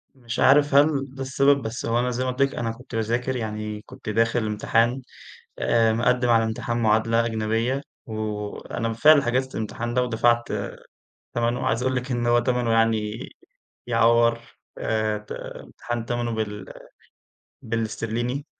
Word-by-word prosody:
مش 120 -2 -6
عارف 145 +1 +5
هل 140 -2 +3
ده 135 - -7
السبب، 140 +1 +3
بس 115 +2 -5
هو 115 +1 +1
أنا 125 +1 0
زي 125 +1 -2
ما 130 - 0
قُلت 125 +2 -4
لِك 140 0 +2
أنا 115 -1 -2
كنت 125 +1 -10
باذاكر، 120 +4 -1
يعني 105 -2 -4
كنت 110 - -10
داخل 115 +2 +1
امتحان 115 +4 +1 0.6
آآ 115 -1 +3
مقدم 125 +2 +2
على 115 -1 +4
امتحان 110 +1 -2
معادلة 115 +1 +3
أجنبية 115 +4 -1 0.2
و 110 - -8
وأنا 105 +1 -4
بالفعل 140 +7 +5
حجزت 130 +1 -1
الامتحان 115 +2 -4
ده 125 - +3
ودفعت 120 -1 +2 0.9
تمنه. 120 +1 0
عايز 115 +2 +1
أقول 130 0 0
لِك 125 +1 -3
إن 120 -1 -1
هو 120 0 +4
تمنه 120 -1 0
يعني 110 -1 +1 0.7
يعوّر 115 0 +3 0.4
آآ 110 -1 0
ت 105 - -10
امتحان 120 -1 -6
تمنه 120 -1 -2
بال 105 -3 -4 0.9
بالإسترليني، 115 +4 -3
115 Hz, 150 wpm, -24 LUFS, 110-125 Hz, 0.9 s, عارف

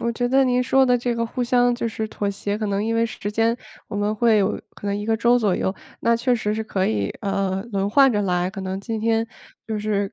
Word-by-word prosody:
我 235 0 -1
觉 245 +1 -1
得 270 +1 +4
您 250 -1 +2
说 265 +1 +4
的 250 -1 +4
这 240 0 -1
个 230 0 -1
互 245 +2 -3
相 245 0 +3
就 235 -1 -2
是 220 0 -3
妥 205 -1 -3
协 200 +1 -3
可 215 - -2
能 200 +1 -1
因 225 - 0
为 230 0 +2
时 205 -2 -5
间 225 +2 +2 0.3
我 - - -5
们 205 +1 0
会 225 0 +3
有 200 0 +1
可 205 - -8
能 200 - 0
1 205 +1 -4
个 225 0 +2
周 240 +2 +4
左 205 -6 +1
右。 190 - -1 0.3
那 235 0 +3
确 245 +2 +1
实 210 -2 -1
是 220 - -2
可 190 -3 -1
以， 100 -2 0
呃， 195 -1 -1
轮 195 0 0
换 270 +4 +5
着 210 - +1
来， 180 -2 0
可 195 -1 -7
能 190 0 -3
今 220 +2 -4
天 225 0 +1 0.4
就 220 -2 -2
是 205 -2 -1
220 Hz, 280 characters per minute, -22 LUFS, 200-235 Hz, 0.4 s, 换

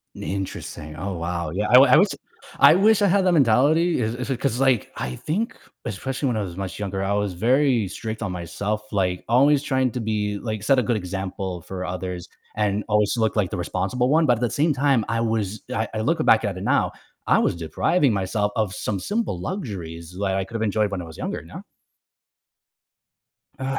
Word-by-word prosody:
Interesting. 95 -5 -5
Oh 95 +4 -4
wow. 85 -1 -3
Yeah, 105 +3 -1
I - - +3
wi 130 +1 +8
I 130 - +8
wish 195 +6 +5 0.5
I - - +8
wish 210 +3 +4
I 205 - +4
had 195 0 +3
that 180 - +3
mentality 155 +5 +3
is 110 0 -1
is 125 +2 -5
it 130 - -1
'cause, 135 -3 0
like, 130 -4 +2
I 65 0 -4
think, 205 +10 -2 0.3
especially 130 +6 -3
when 120 -3 0
I 110 - 0
was 90 -3 -6
much 95 -1 -5
younger, 100 -2 -3
I 95 +1 0
was 105 -2 0
very 120 +3 +2
strict 110 +3 -6
on 105 - -2
myself, 100 +5 -3
like, 90 -3 0
always 140 +4 +4
trying 130 -3 +1
to 125 - -3
be 105 -2 -1
like, 110 -2 -4
set 135 +5 +3
a - - +4
good 120 -2 0
example 95 -1 -5
for 90 +1 -6
others 90 0 -5 0.3
and 105 -1 0
always 105 -1 +2
look 110 -2 0
like 100 -4 +1
the - - -3
responsible 95 +8 -1
one, 160 +2 +4
but 125 - +5
at - - -9
the 120 - +1
same 150 +1 +1
time, 135 -3 +2
I 115 +1 0
was 110 -3 -2
I 110 0 -1
I 110 - -2
look 160 +8 +1
back 115 0 +5
at 100 -3 -2
it - - -6
now, - - +2 0.3
I - - +4
was - - +1
depriving 120 - +1
myself 105 +1 -1
of 105 -4 -1
some 100 -3 -3
simple 205 - -2
luxuries 90 - -6
that 95 -2 0
I 95 - 0
could 115 - -15
have 110 - -3
enjoyed 105 -1 +1
when 95 -2 -3
I - - -6
was 80 - -11
younger, - - -4
you - - -15
know? - - -9 2.0
Ugh. 135 0 -2
110 Hz, 215 wpm, -23 LUFS, 95-130 Hz, 2.0 s, wi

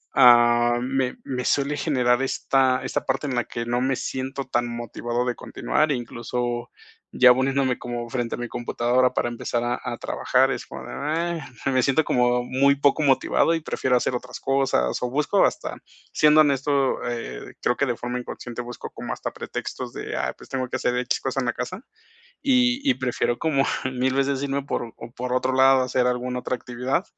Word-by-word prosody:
ah 120 -1 +6
me 130 0 -1
me 125 -1 -3
suele 145 +1 +1
generar 125 -5 +2
esta 130 -1 +2
esta - - -2
parte 135 +2 -1
en 130 - -2
la 120 - +1
que 120 0 -5
no 120 +1 0
me 130 0 +1
siento 135 +1 -4
tan 120 -2 0
motivado 120 +1 -3
de 125 -1 -1
continuar. 155 0 -1
Incluso 120 -1 -3 0.4
ya 125 -1 +8
poniéndome 130 0 +1
como 120 -1 -5
frente 120 -2 -2
a - - -10
mi 120 - -3
computadora 120 +2 +1
para - - 0
empezar 120 0 -2
a 120 0 -1
a - - -4
trabajar - - +1
es - - -4
como - - -8
de: - - -8
"ah". 165 +3 -2 0.2
me 130 -1 +3
siento 140 +4 +3
como 125 -2 +2
muy 135 +3 +3
poco 145 +2 +2
motivado 135 +4 +3
y 165 - -1
prefiero 130 -4 0
hacer 125 - -1
otras 125 - -6
cosas, 135 - +1
o 125 - -1
busco 145 +2 +3
hasta - - -2 0.3
siendo 150 0 +6
honesto, 140 -1 +2 0.4
eh, 115 - -6
creo 125 - +1
que, - - +2
de 120 - 0
forma 120 +1 -3
inconsciente, 125 0 -6
busco 120 0 -8
como - - -5
hasta - - -5
pretextos - - -6
de: - - -5
"Ah, - - -1
pues, - - -15
tengo 130 -1 -2
que - - -2
hacer 125 - 0
X 125 0 0
cosa 135 0 -2
en 125 - -2
la - - +1
casa". 185 - -6 0.6
Y 255 -1 +3
y 260 - +5
prefiero 120 -1 -1
como 140 -4 +2 0.3
1000 130 +1 0
veces 135 0 +1
irme 140 0 -1
por 120 -4 -4
o 115 - -10
por 125 0 -3
otro 130 +1 +1
lado, 130 0 +5
hacer 125 0 +1
alguna 125 0 -1
otra 125 - -2
actividad. 125 +6 -2
125 Hz, 195 wpm, -24 LUFS, 120-135 Hz, 0.6 s, ya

